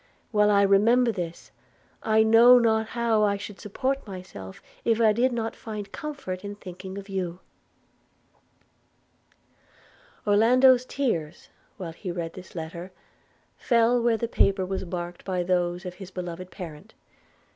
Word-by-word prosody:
while 210 -2 +4
I 200 -1 +4
remember 230 +5 +4
this, 175 -5 -6 0.5
I 220 0 +3
know 230 +3 +7
not 220 -2 +2
how 230 -2 +1
I 200 -1 +2
should 205 0 -9
support 260 +5 -3
myself 180 - -9 0.2
if 230 -1 +2
I 220 -2 +5
did 250 +4 +2
not 225 -2 -3
find 210 -3 -7
comfort 280 -12 -6
in 205 0 -6
thinking 190 0 -9
of 200 0 -8
you.' 185 -3 -4 2.9
Orlando's 250 +5 +5
tears, 175 - -2 0.3
while 180 -5 -6
he 185 +3 -7
read 170 -1 -4
this 185 0 -12
letter, 170 +2 -6 0.7
fell 235 0 +3
where 230 -1 +2
the 235 - -2
paper 195 -4 +2
was 190 +1 -3
marked 175 0 -5
by 185 -2 -1
those 175 0 0
of 180 +1 -7
this 190 -2 -8
beloved 180 -1 -6
parent. 160 -6 -10
200 Hz, 140 wpm, -26 LUFS, 180-230 Hz, 2.9 s, know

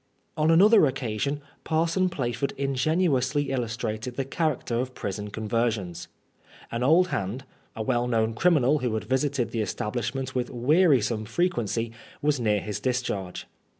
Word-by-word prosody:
On 155 0 +2
another 195 +1 +6
occasion. 135 +2 -2 0.2
Parson 165 +3 +1
Plaford 125 -4 -2
ingenuously 140 0 +1
illustrated 115 -1 -3
the 135 - -2
character 150 -4 -1
of 130 +1 -3
prison 105 +1 -4
conversions. 105 -5 -2 0.6
An 115 - -2
old 165 +8 +4
hand, 100 - -3 0.3
a 110 - -3
well 120 +1 +1
known 115 -2 +1
criminal 150 0 +3
who 125 -4 -1
had 110 - -2
visited 130 -3 0
the 115 - -1
establishment 125 +5 -3
with 125 -1 -1
wearisome 125 - +2
frequency, 115 - -1 0.3
was 145 -2 +1
near 105 -3 +1
his 105 -1 -4
discharge. 105 -7 -2
125 Hz, 135 wpm, -26 LUFS, 110-145 Hz, 0.6 s, another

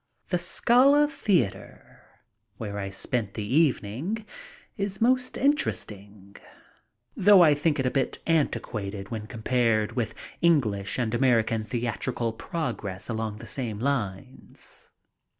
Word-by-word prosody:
The 180 - +1
Scala 260 +11 +4
Theater, 195 - -2 0.6
where 105 -2 -5
I 100 -1 -4
spent 105 +1 -3
the 105 - -3
evening, 145 - 0 0.5
is 200 -1 -3
most 255 +2 +2
interesting, 105 - -2 0.8
though 200 -2 +7
I 155 -3 +6
think 145 +1 0
a 130 -2 0
bit 135 -1 -1
antiquated 105 -11 -1
when 110 -2 -5
compared 115 -2 +1
with 120 -2 -3 0.3
English 110 -13 +2
and 120 -3 -1
American 115 -3 +2
theatrical 120 0 -2
progress 105 - -5
along 110 -2 -3
the 105 - -10
same 120 -6 -4
lines. 125 -2 -5
120 Hz, 115 wpm, -26 LUFS, 105-165 Hz, 0.8 s, though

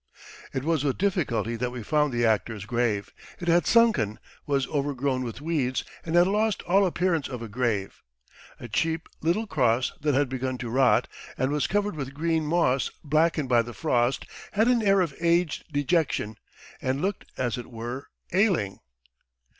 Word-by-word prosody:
It 130 - -3
was 160 -2 +1
with 140 -3 0
difficulty 135 - 0
that 125 +2 -1
we 125 -2 -7
found 150 +3 +2
the 120 -1 +1
actor's 110 -2 0
grave. 115 -4 -1 0.3
It 175 - -6
had 175 +1 +4
sunken, 225 - +4 0.3
was 140 -2 +1
overgrown 140 -2 -1
with 120 +3 -6
weeds, 145 -5 0 0.2
and 165 0 -2
had 175 0 +7
lost 210 +2 +1
all 195 +2 +3
appearance 170 -4 0
of 125 -3 -6
a - - -5
grave. 110 -3 -2 0.6
A 120 - -7
cheap, 160 +8 -1
little 175 +8 +1
cross 130 - +1
that 145 -2 +1
had 145 +1 +3
begun 130 0 -3
to 120 -2 -5
rot, 130 0 +4 0.3
and 130 +1 0
was 150 -1 +1
covered 205 -1 0
with 135 -2 -5
green 160 +1 0
moss 150 -5 +2
blackened 155 -1 +2
by 120 -2 +5
the 120 +1 -8
frost, 125 -5 +1 0.3
had 220 +3 +3
an 245 -2 +4
air 195 -2 +4
of 165 -6 -1
aged 170 -1 +1
dejection 145 -7 0 0.4
and 130 +1 -1
looked, 195 +1 -2
as 125 -1 -1
it 120 - -8
were, 120 +4 -6 0.3
ailing. 180 - +2
140 Hz, 170 wpm, -26 LUFS, 125-170 Hz, 0.6 s, had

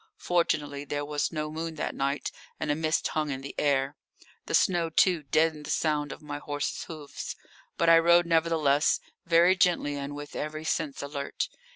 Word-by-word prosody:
Fortunately 145 -5 0
there 145 0 -3
was 145 0 -1
no 155 -2 -3
moon 160 +1 -4
that 155 - -3
night 140 +1 -1 0.3
and 150 - 0
a - - +1
mist 155 0 0
hung 155 -1 -1
in 135 -1 -3
the 140 - -7
air. 140 -1 +1 0.5
The - - +1
snow, 175 -3 +3
too, 175 +1 +3
deadened 155 +1 +1
the - - -7
sound 150 -2 0
of - - -9
my 145 -1 -5
horse's 145 0 -3
hoofs. 155 -3 -7 0.4
But 170 - +2
I 165 0 +8
rode, 170 +1 +5
nevertheless, 160 -3 +3 0.3
very 170 +2 +5
gently 175 -5 +2
and 140 +1 -5
with 145 0 -8
every 155 +1 -4
sense 150 -3 -2
alert. 140 0 -3
150 Hz, 180 wpm, -28 LUFS, 145-165 Hz, 0.5 s, I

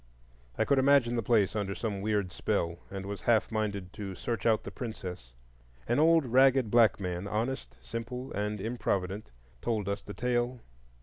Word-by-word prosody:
I - - +2
could 140 -1 +3
imagine 130 -3 +4
the 115 - +1
place 110 -3 +2
under 100 -2 -1
some 105 -4 -3
weird 100 -3 0
spell, 85 0 -1
and 95 -1 -6
was 100 0 -5
half 115 -2 +2
minded 100 -4 -2
to 100 -3 -6
search 115 +3 -2
out 110 -2 +3
the - - -7
princess. 90 - -6 0.6
An 120 +4 +2
old 165 -1 +5
ragged 130 -1 +4
black 115 -5 +5
man, 90 0 -3
honest, 115 +6 -2
simple, 125 +3 -6
and 105 +1 -2
improvident, 100 - -2 0.3
told 110 -4 -1
us 100 0 -2
the 105 - -9
tale. 125 0 0
110 Hz, 170 wpm, -30 LUFS, 100-120 Hz, 0.6 s, old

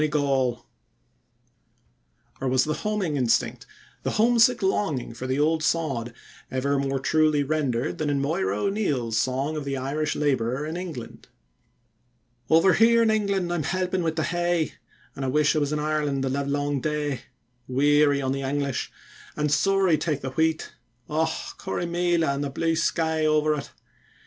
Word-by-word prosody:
[Footnote 150 -1 +1
1: - - 0
"Your 140 -1 +2 0.2
health."] - - -26 1.8
Or 135 - -1
was 130 0 +3
the 155 - -1
homing 200 -6 -2
instinct, 125 -4 0 0.3
the - - -2
homesick 235 +1 +3
longing 190 - 0
for 125 +3 -6
the 130 +1 0
old 155 +2 +2
sod, 135 -9 0 0.4
ever 140 +2 0
more 135 0 -1
truly 155 +1 +2
rendered 135 -5 -1
than 155 -1 0
in 140 -1 +1
Moira 135 - 0
O'Neill's 140 - 0
song 135 +6 -1
of 150 - -3
the 140 -1 -3
Irish 145 +4 -2
laborer 135 -1 0
in 160 +2 -4
England? 165 -10 -7 1.2
Over 165 +4 +5
here 230 +1 +5
in 220 - +3
England 200 -5 0
I'm 175 - 0
helpin' 185 +3 -1
wi' 165 - +1
the 160 0 -2
hay, 175 -2 0 0.4
An' 135 - -5
I - - -1
wish 150 +4 +2
I - - +3
was 145 -1 -1
in 150 - 0
Ireland 150 -2 -1
the 135 - 0
livelong 140 0 -1
day; 150 -3 -2 0.5
Weary 145 +2 +3
on 130 - 0
the 135 0 -2
English, 140 -1 -2 0.5
an' 150 0 +1
sorra 190 +1 +3
take 150 -2 -2
the 130 - -4
wheat! 160 +2 0 0.4
Och! 160 +1 +1 0.3
Corrymeela 175 -2 0
an' 140 - -3
the 145 - -2
blue 165 +4 0
sky 160 -1 0
over 155 0 +3
it. 145 -2 -5
150 Hz, 165 wpm, -25 LUFS, 135-165 Hz, 1.8 s, Over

